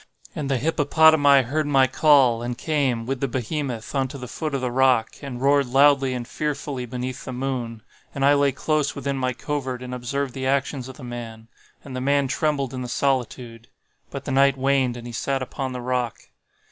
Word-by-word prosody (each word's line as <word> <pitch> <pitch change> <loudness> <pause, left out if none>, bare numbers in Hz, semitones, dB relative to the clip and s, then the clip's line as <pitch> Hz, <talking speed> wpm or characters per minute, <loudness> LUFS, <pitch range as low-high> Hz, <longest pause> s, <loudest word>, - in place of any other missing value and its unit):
And 145 -2 -3
the 135 - +1
hippopotami 145 -1 +4
heard 150 +5 -1
my 135 -2 +4
call, 130 -3 +4
and 120 0 -4
came, 135 -7 0
with 135 +1 -3
the 140 - 0
behemoth, 125 -1 -4
unto 135 0 -1
the 125 -2 -7
foot 155 +3 -4
of 135 - -2
the 125 -1 -1
rock, 130 -3 +2
and 135 -4 -6
roared 140 0 +3
loudly 135 0 +4
and 120 -1 -5
fearfully 145 -4 -3
beneath 125 +1 -5
the - - -6
moon. 125 -3 -4 0.3
And 135 -1 +1
I 140 - +6
lay 140 -1 +3
close 150 +2 -1
within 140 -1 -2
my 130 -1 -1
covert 130 -2 -4
and 125 0 -6
observed 130 +2 -3
the 130 -1 -3
actions 135 -1 -1
of 130 - -10
the 140 - -11
man. 115 -2 -8 0.3
And 135 -2 -8
the 130 - -3
man 140 +1 +2
trembled 140 -1 -1
in 130 - -4
the 125 - -4
solitude;—but 125 0 -4
the - - -3
night 135 0 +4
waned 135 -2 +1
and 120 - -9
he 120 - -7
sat 135 +3 -1
upon 130 0 -4
the 125 -1 -5
rock. 125 -2 -1
130 Hz, 195 wpm, -23 LUFS, 125-140 Hz, 0.3 s, I